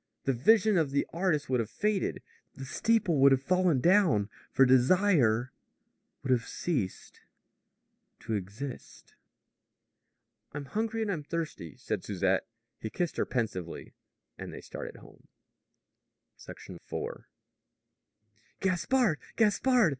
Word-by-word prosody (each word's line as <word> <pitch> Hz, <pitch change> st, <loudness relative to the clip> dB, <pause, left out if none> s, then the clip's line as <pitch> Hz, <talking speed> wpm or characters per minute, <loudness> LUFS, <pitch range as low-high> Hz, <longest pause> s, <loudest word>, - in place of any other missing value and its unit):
The 135 Hz, -, +1 dB
vision 215 Hz, -, +4 dB
of 155 Hz, -4 st, +1 dB
the 140 Hz, +1 st, 0 dB
artist 165 Hz, -4 st, 0 dB
would 130 Hz, -1 st, +1 dB
have 110 Hz, -2 st, -2 dB
faded. 210 Hz, -, -1 dB, 0.3 s
The 135 Hz, -, -7 dB
steeple 210 Hz, -, +1 dB
would 140 Hz, +1 st, +7 dB
have 135 Hz, 0 st, +3 dB
fallen 180 Hz, -3 st, +2 dB
down. 170 Hz, -, +4 dB, 0.2 s
For 135 Hz, -, +5 dB
desire 130 Hz, -, +4 dB, 0.7 s
would 135 Hz, -, -1 dB
have 120 Hz, -2 st, +3 dB
ceased 135 Hz, -, -3 dB, 1.0 s
to 115 Hz, -, -4 dB
exist. 105 Hz, +7 st, -6 dB, 1.4 s
"I'm 145 Hz, 0 st, -5 dB
hungry 225 Hz, +6 st, -2 dB
and 210 Hz, -, -1 dB
I'm 165 Hz, -6 st, -2 dB
thirsty," 150 Hz, -, -5 dB
said -, -, -3 dB
Susette. 95 Hz, -1 st, 0 dB, 0.3 s
He 110 Hz, -, -5 dB
kissed 175 Hz, +8 st, -2 dB
her -, -, 0 dB
pensively. 105 Hz, -9 st, -3 dB, 0.5 s
They -, -, -7 dB
started -, -, -8 dB
home. -, -, -17 dB, 1.2 s
IV. -, -, -7 dB, 1.3 s
"Gaspard! 195 Hz, -, +1 dB, 0.2 s
Gaspard!" 230 Hz, 0 st, +3 dB
145 Hz, 115 wpm, -30 LUFS, 125-195 Hz, 1.4 s, would